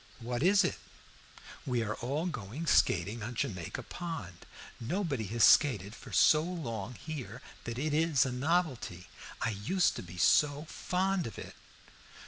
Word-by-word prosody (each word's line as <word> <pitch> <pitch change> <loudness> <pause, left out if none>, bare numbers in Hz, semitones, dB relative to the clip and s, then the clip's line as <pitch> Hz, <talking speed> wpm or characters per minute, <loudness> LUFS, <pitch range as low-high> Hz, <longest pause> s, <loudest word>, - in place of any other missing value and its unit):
"What 120 +1 -3
is 200 +4 +5
it?" 185 - -1 0.8
"We 125 -3 0
are 110 -1 -2
all 140 +7 -2
going 140 - -5
skating 105 - +2
on 120 +3 -5
Jamaica 90 -6 -3
Pond. 160 - -7 0.3
Nobody 140 - -2
has 115 +3 0
skated 105 -9 +5
for - - -12
so 150 - +5
long 125 - -5
here 130 -8 -7 0.3
that 115 0 -4
it 150 +3 -1
is 155 -4 +3
a 130 - -2
novelty. 130 - -1 0.3
I 115 - +1
used 110 - +1
to - - -4
be 90 0 -11
so 145 - +3
fond 185 -1 -1
of 110 - -9
it." - - -8
125 Hz, 150 wpm, -31 LUFS, 110-165 Hz, 0.8 s, is